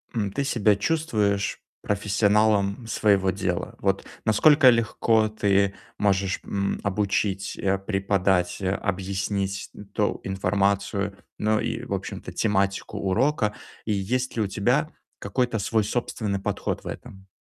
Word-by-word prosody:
м, 100 Hz, -3 st, -1 dB
ты 140 Hz, -, -1 dB
себя 110 Hz, -6 st, +3 dB
чувствуешь 105 Hz, -7 st, 0 dB, 0.2 s
профессионалом 105 Hz, +1 st, +2 dB
своего 100 Hz, -4 st, +2 dB
дела? 90 Hz, -1 st, -2 dB
Вот -, -, 0 dB, 0.2 s
насколько 140 Hz, +5 st, +6 dB
легко 115 Hz, -1 st, +2 dB
ты 100 Hz, -2 st, +2 dB, 0.2 s
можешь, 95 Hz, -2 st, +1 dB
м, 100 Hz, -1 st, -2 dB
обучить, 100 Hz, 0 st, -1 dB
э, 95 Hz, 0 st, +1 dB
преподать, 95 Hz, -2 st, 0 dB
а, 95 Hz, +1 st, 0 dB
объяснить 95 Hz, +1 st, -2 dB, 0.2 s
то 105 Hz, -, 0 dB
информацию, 100 Hz, +1 st, 0 dB, 0.2 s
ну 110 Hz, 0 st, +1 dB
и, -, -, -3 dB
в -, -, -4 dB
общем-то, -, -, -5 dB
тематику 100 Hz, -2 st, 0 dB
урока, 105 Hz, +3 st, +1 dB, 0.3 s
и 110 Hz, -, -1 dB
есть 125 Hz, +7 st, -1 dB
ли 115 Hz, -, 0 dB
у 105 Hz, -, +1 dB
тебя 125 Hz, +10 st, +1 dB, 0.3 s
какой-то 120 Hz, -4 st, -1 dB
свой 110 Hz, +2 st, +1 dB
собственный 105 Hz, -2 st, -2 dB
подход 100 Hz, 0 st, -3 dB
в -, -, -9 dB
этом? 95 Hz, 0 st, -9 dB
100 Hz, 125 wpm, -25 LUFS, 95-110 Hz, 0.3 s, насколько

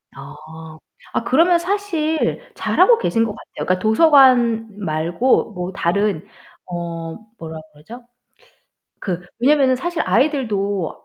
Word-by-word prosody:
아, 160 Hz, 0 st, -12 dB, 0.4 s
아 -, -, -1 dB
그러면 335 Hz, +8 st, +3 dB
사실 340 Hz, -4 st, -1 dB
잘하고 480 Hz, -1 st, +3 dB
계신 230 Hz, -, 0 dB
거 225 Hz, -, -2 dB
같아요. -, -, -9 dB
그러니까 185 Hz, 0 st, 0 dB
도서관 240 Hz, -, +4 dB
말고 170 Hz, +9 st, 0 dB
뭐 180 Hz, 0 st, -5 dB
다른 195 Hz, -1 st, -1 dB, 0.4 s
어 170 Hz, -2 st, -6 dB, 0.2 s
뭐라 160 Hz, -1 st, -8 dB
그러죠? 225 Hz, +12 st, -13 dB, 1.0 s
그 180 Hz, -3 st, -3 dB, 0.2 s
왜냐면은 265 Hz, +1 st, +3 dB
사실 345 Hz, +6 st, -3 dB
아이들도 205 Hz, -, -1 dB
220 Hz, 245 characters per minute, -19 LUFS, 175-280 Hz, 1.0 s, 도서관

